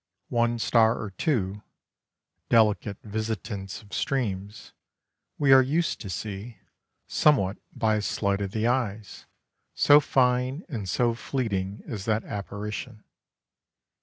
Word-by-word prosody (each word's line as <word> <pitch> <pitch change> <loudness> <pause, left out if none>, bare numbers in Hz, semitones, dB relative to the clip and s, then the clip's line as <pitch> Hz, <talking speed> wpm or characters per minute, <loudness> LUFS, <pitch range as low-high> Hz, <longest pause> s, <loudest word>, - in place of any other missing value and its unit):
One 120 0 +2
star 115 0 +3
or 105 - -5
two 100 - -1 0.9
delicate 105 -2 +3
visitants 105 -2 -4
of 100 - -17
streams 105 -6 -3 0.6
we 140 -2 +5
are 135 - +9
used 155 +6 0
to 100 - -6
see, 105 +3 -6 0.5
somewhat 105 -11 +3
by 110 -1 +1
a - - -1
sleight 100 -1 -1
of 100 - -2
the 110 +3 -2
eyes, 110 -4 -2 0.5
so 145 +1 +7
fine 130 +2 +1
and 110 - -5
so 120 +5 +2
fleeting 105 -6 -3
is 105 -4 -6
that 110 -1 +1
apparition. 105 +2 -6
110 Hz, 120 wpm, -26 LUFS, 100-125 Hz, 0.9 s, are